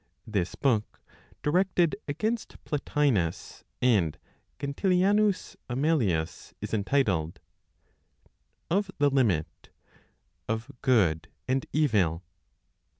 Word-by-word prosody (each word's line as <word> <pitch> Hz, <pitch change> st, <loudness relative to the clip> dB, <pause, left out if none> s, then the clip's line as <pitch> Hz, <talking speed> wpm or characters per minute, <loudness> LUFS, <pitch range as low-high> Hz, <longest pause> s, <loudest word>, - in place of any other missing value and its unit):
This 100 Hz, -5 st, -2 dB
book, 115 Hz, -6 st, 0 dB, 0.4 s
directed 175 Hz, +1 st, +2 dB
against 215 Hz, +10 st, -2 dB
Plotinos 140 Hz, -, 0 dB, 0.2 s
and 95 Hz, -11 st, +3 dB, 0.4 s
Gentilianus 190 Hz, +8 st, +1 dB
Amelius, 120 Hz, -, 0 dB
is -, -, -6 dB
entitled 100 Hz, -, +1 dB, 1.3 s
"Of 195 Hz, +2 st, +1 dB
the 145 Hz, -1 st, +3 dB
Limit 105 Hz, -, 0 dB, 0.8 s
(of 110 Hz, +4 st, -2 dB
Good 90 Hz, -11 st, +3 dB, 0.2 s
and 130 Hz, +1 st, 0 dB
Evil?)" 100 Hz, -, +2 dB
130 Hz, 80 wpm, -28 LUFS, 95-155 Hz, 1.3 s, and